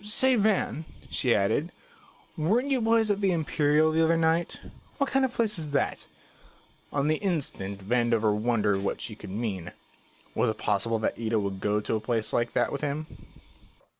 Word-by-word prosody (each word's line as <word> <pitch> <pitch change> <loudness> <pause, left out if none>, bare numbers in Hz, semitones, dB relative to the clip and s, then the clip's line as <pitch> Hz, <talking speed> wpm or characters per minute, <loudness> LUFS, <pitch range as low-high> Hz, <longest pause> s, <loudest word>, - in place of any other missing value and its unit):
Say, 255 +5 +3
Van," 205 -7 +1 0.3
she 125 -4 +2
added, 110 - +1 0.6
"weren't 225 - +1
you 260 -3 +2
boys 225 -1 +3
at 205 0 -1
the 195 -2 +3
Imperial 155 -1 +2
the 160 +1 +3
other 165 +1 +3
night? 165 +1 +1 0.4
What 280 -1 0
kind 270 0 +3
of 265 - +2
a - - -17
place 215 -5 0
is 155 -2 -3
that?" - - -2 0.8
On 140 -1 0
the 155 +1 +2
instant 100 - -3
Vandover 115 -2 +2
wondered 105 -3 +1
what - - -2
she - - -6
could - - -10
mean. 95 -4 -4 0.6
Was - - +1
it 110 - -3
possible 105 +2 0
that 110 - -2
Ida 115 -1 0
would 100 -2 -3
go 105 +1 +1
to 110 - -1
a - - 0
place 110 -1 -2
like 120 0 0
that - - +1
with 140 - -4
him? 150 +1 -2
145 Hz, 185 wpm, -27 LUFS, 110-180 Hz, 0.8 s, Say